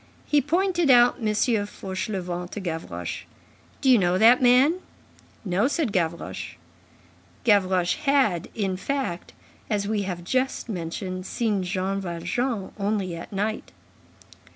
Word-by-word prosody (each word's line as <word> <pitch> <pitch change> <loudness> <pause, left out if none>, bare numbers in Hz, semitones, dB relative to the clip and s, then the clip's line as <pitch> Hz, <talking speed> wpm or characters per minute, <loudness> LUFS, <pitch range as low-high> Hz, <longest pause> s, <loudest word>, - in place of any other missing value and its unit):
He 295 -1 +3
pointed 345 +2 +1
out 245 -1 +6
M. 225 - -2
Fauchelevent 195 -5 -2
to - - -4
Gavroche. 160 - -5 0.6
"Do 265 - +3
you 245 - +6
know 180 -1 +2
that 235 +5 +6
man?" 260 +8 +5 0.7
"No," 195 +5 +2
said 290 -5 0
Gavroche. 170 -3 -2 0.9
Gavroche 185 -5 +3
had, 270 - +2
in 195 -4 -1
fact, 260 -5 -3 0.4
as 205 -2 0
we 210 -1 0
have 180 -3 -4
just 260 +9 -1
mentioned, 185 0 -4
seen 215 -5 0
Jean 190 +1 -2
Valjean 190 +5 -2
only 200 -3 -1
at 170 - -9
night. 210 +2 -3
200 Hz, 125 wpm, -25 LUFS, 180-245 Hz, 0.9 s, out